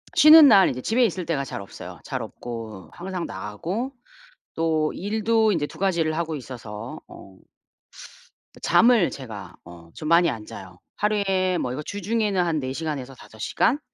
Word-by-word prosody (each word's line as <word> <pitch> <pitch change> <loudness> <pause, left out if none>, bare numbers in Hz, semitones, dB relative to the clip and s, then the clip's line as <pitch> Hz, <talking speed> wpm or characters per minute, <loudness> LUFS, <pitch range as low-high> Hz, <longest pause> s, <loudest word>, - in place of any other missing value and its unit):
쉬는 310 0 +9
날 200 -7 +7
인제 130 - -4
집에 235 - +2
있을 185 -5 0
때가 150 -5 -1
잘 135 - -6
없어요. 100 - -10
잘 - - -4
없고 110 -7 -8
항상 180 -1 -5
나가고 165 - -4 0.6
또 160 -1 0
일도 220 +2 +1
인제 155 -5 0
2 - - -14
가지를 170 -5 +1
하고 165 -1 -2
있어서 120 0 -8
어 95 -1 -14 1.2
그 - - -15
잠을 230 -6 +4
제가 115 -7 -9
어 85 -1 -14
좀 155 - -6
많이 170 +1 +5
안 110 -2 -6
자요. 90 -3 -11 0.2
하루에 195 -3 +1
뭐 125 - -2
이거 130 +4 -4
주중에는 205 0 -1
한 165 -3 0
4 130 -1 -4
시간에서 140 -4 -4
5 110 - -15
시간 260 - +1
160 Hz, 285 characters per minute, -24 LUFS, 125-200 Hz, 1.2 s, 쉬는